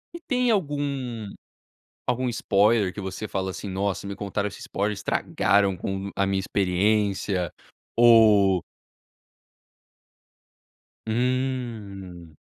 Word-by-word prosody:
E - - -6
tem 250 -4 +1
algum, 140 - -2 0.8
algum 125 +1 0
spoiler 105 -2 +2
que 105 - -9
você 95 +2 -5
fala 95 -1 -2
assim: 100 - -6
"Nossa, 100 +1 -2
me 100 - -5
contaram 100 0 -2
esse - - -9
spoiler, 105 +2 -2
estragaram 100 0 +1
com 95 +2 -4
a 100 - +2
minha 95 0 0
experiência"? 95 -1 0 0.4
Ou 110 -6 +6 2.4
Hum. 110 - -3
100 Hz, 100 wpm, -25 LUFS, 95-120 Hz, 2.4 s, Ou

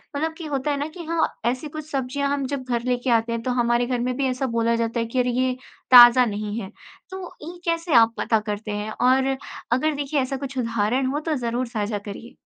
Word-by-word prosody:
मतलब 320 +2 -1
कि 330 - -7
होता 290 0 -1
है 285 - -1
ना 290 - -2
कि 340 +1 -9
हाँ, 330 0 +1 0.2
ऐसी 255 +5 -1
कुछ 310 +1 -8
सब्जियाँ 275 +1 -1
हम 280 -2 -1
जब 280 -1 -4
घर 235 -1 0
लेके 250 0 -1
आते 230 0 +2
हैं 230 - -2
तो 255 - -1
हमारे 240 0 +2
घर 250 -2 -1
में 250 +1 -1
भी 275 - 0
ऐसा 255 +1 -1
बोला 230 0 +2
जाता 230 0 -1
है 230 - 0
कि 245 +3 -2
अरे 250 0 +2
ये 255 0 +2 0.4
ताज़ा 245 0 +9
नहीं 210 0 -3
है। 190 - -6 0.4
तो 380 0 -6 0.2
ये 340 +4 -8
कैसे 335 -2 -1
आप 230 0 +6
पता 220 -2 +1
करते 210 0 -5
हैं? 210 +1 -3
और 265 +3 +2 0.4
अगर 295 +5 +1
देखिए 285 +1 -1
ऐसा 265 +1 -2
कुछ 275 -1 -6
उदाहरण 230 +2 0
हो 295 - 0
तो 310 0 -2
ज़रूर 245 -1 -2
साझा 210 -2 -2
करिए। 205 +5 -9
250 Hz, 235 wpm, -23 LUFS, 230-280 Hz, 0.4 s, ताज़ा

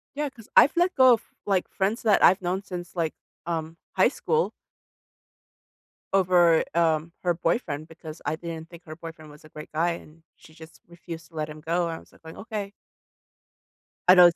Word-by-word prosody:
Yeah, 295 0 -1
'cause 230 -5 -16
I've 285 - +7
let 355 +1 +3
go 260 -1 +7
of, 230 - 0 0.2
like, 195 -3 +1
friends 205 +4 -1
that 215 -3 +4
I've 190 - +6
known 185 +2 -2
since, 180 -2 -7
like, 165 -2 -1 0.3
um, 165 -1 -3 0.2
high - - +6
school 470 0 0 1.6
over, 175 -4 +5
um, 165 -1 +2
her 175 -1 +2
boyfriend 165 - -1
because 160 -1 -10
I 155 - 0
didn't 165 -1 -7
think 175 0 -14
her 155 0 -8
boyfriend 165 -2 -10
was 150 - -16
a 155 - -15
great 150 0 -10
guy, 170 +3 +2
and 165 -1 -10
she 155 - -18
just 160 +1 -14
refused 170 -1 -9
to 165 - -20
let 155 0 -3
him 155 0 -9
go. 170 +2 0
I 165 -1 -4
was - - -20
like - - -21
going, 160 - -10
"Okay" 215 0 -4 1.4
I - - +11
know 180 -1 +10
it 175 - +1
170 Hz, 190 wpm, -26 LUFS, 160-190 Hz, 1.6 s, I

